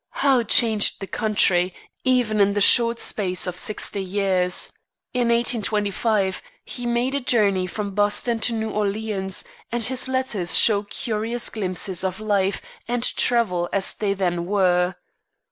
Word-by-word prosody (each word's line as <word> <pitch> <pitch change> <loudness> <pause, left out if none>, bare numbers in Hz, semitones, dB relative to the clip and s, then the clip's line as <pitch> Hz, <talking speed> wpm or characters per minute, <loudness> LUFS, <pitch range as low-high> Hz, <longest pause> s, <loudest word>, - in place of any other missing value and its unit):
How 265 -3 +4
changed 220 -1 +3
the 195 - -5
country, 185 -3 +1 0.3
even 245 -5 +1
in 200 0 +3
the 205 - -1
short 235 +3 +5
space 185 -5 -1
of 180 -1 -4
sixty 200 +1 -2
years! 185 -2 0 0.4
In 245 -2 0
1825 215 -3 0 0.2
he 245 -1 -5
made 240 +3 0
a 280 - 0
journey 205 -7 +1
from 200 +1 -5
Boston 210 +3 +1
to 235 - 0
New 220 -1 -3
Orleans, 205 -2 -3 0.3
and 240 0 -2
his 255 +2 0
letters 260 -9 0
show 205 -3 +6
curious 220 +2 -3
glimpses 190 -2 -2
of 190 0 -3
life 200 -2 -1 0.2
and 240 0 -1
travel 185 -8 +1
as 195 -1 +1
they 200 -2 -2
then 175 -3 -2
were. 180 -2 +1
210 Hz, 145 wpm, -22 LUFS, 190-235 Hz, 0.4 s, show